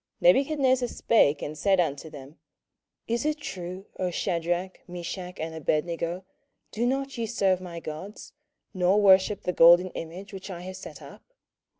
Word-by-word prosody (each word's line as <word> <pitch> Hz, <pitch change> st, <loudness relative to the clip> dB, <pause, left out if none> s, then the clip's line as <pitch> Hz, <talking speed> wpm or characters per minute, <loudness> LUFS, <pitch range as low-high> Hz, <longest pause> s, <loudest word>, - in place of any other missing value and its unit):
27:003:014 -, -, +8 dB
Nebuchadnezzar 265 Hz, -3 st, +1 dB
spake 155 Hz, -13 st, +2 dB
and 150 Hz, -, -5 dB
said 195 Hz, -2 st, +3 dB
unto 160 Hz, -2 st, -1 dB
them, 145 Hz, 0 st, -12 dB, 0.7 s
Is 235 Hz, +3 st, -1 dB
it 305 Hz, 0 st, 0 dB
true, 185 Hz, -8 st, -7 dB
O 185 Hz, -, 0 dB
Shadrach, 175 Hz, +1 st, -2 dB
Meshach, 180 Hz, +1 st, -6 dB
and 160 Hz, +1 st, -4 dB
Abednego, 170 Hz, +3 st, -2 dB, 0.5 s
do 235 Hz, +3 st, 0 dB
not 270 Hz, 0 st, -2 dB
ye 230 Hz, -, -1 dB
serve 195 Hz, -6 st, +1 dB
my 175 Hz, -2 st, -7 dB
gods, 165 Hz, +6 st, -8 dB, 0.4 s
nor 185 Hz, +2 st, +3 dB
worship 195 Hz, 0 st, +4 dB
the 180 Hz, -, -1 dB
golden 175 Hz, +2 st, +7 dB
image 180 Hz, +5 st, -8 dB
which 190 Hz, +1 st, -8 dB
I 175 Hz, -2 st, -6 dB
have 185 Hz, +1 st, -7 dB
set -, -, -10 dB
up? -, -, -12 dB
185 Hz, 160 wpm, -27 LUFS, 170-210 Hz, 0.7 s, 27:003:014